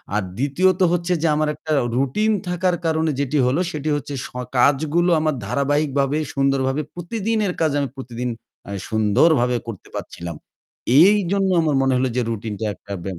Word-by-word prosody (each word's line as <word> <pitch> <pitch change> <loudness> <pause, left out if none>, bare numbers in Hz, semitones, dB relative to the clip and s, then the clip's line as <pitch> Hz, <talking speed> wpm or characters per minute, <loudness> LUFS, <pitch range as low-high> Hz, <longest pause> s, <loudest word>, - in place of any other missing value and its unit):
আর 105 - +2 0.2
দ্বিতীয়ত 180 +8 +1
হচ্ছে 175 +1 0
যে 165 - +2
আমার 155 0 +1
একটা 155 - -7 0.3
রুটিন 140 +12 +1 0.2
থাকার 180 0 +1
কারণে 160 -1 +1
যেটি 140 +1 0
হল 130 +4 +1
সেটি 150 -1 -3
হচ্ছে 145 0 -6
স - - -16 0.3
কাজগুলো 155 +6 +3
আমার 155 -2 0
ধারাবাহিকভাবে 140 +2 +1 0.2
সুন্দরভাবে 135 0 +1
প্রতিদিনের 210 +2 -2
কাজ 160 -2 +3
আমি 140 -2 -1
প্রতিদিন 125 -1 -4 0.4
অ্যা - - -8 0.2
সুন্দরভাবে 120 +4 +3
করতে 110 -5 -8
পারছিলাম। 85 -1 -7 0.7
এই 200 +4 +6
জন্য 195 -1 +2
আমার 155 -3 +1
মনে 135 0 +2
হলো 130 +1 +1
যে - - +3
রুটিনটা 110 -1 -4
একটা 100 - -9
ব - - -12
145 Hz, 160 wpm, -21 LUFS, 130-170 Hz, 0.7 s, এই